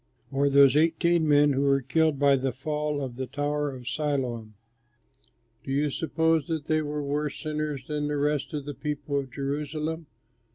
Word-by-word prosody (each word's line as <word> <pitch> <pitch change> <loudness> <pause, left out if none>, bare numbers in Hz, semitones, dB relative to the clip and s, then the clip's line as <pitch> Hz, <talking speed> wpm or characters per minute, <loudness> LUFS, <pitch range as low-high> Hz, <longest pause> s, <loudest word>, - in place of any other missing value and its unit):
Or 140 +1 +2
those 140 -1 +6
eighteen 165 +1 +3
men 145 -1 +5
who 135 - 0
were 140 -1 +3
killed 160 +1 +2
by 140 0 +4
the 135 0 -1
fall 150 +2 -2
of 125 -2 -6
the 130 -1 -3
tower 145 +2 -1
of 125 -3 -9
Siloam 125 -7 -2 1.1
do 135 - -6
you 145 +1 +1
suppose 160 0 +1
that 160 -3 -3
they 155 0 +1
were 150 -1 -3
worse 145 +1 -2
sinners 150 -3 -3
than 150 0 -2
the 150 0 -1
rest 145 0 0
of 145 -2 -4
the 145 - -5
people 145 +1 -3
of 135 -1 -6
Jerusalem? 150 +4 -3
145 Hz, 175 wpm, -27 LUFS, 140-150 Hz, 1.1 s, those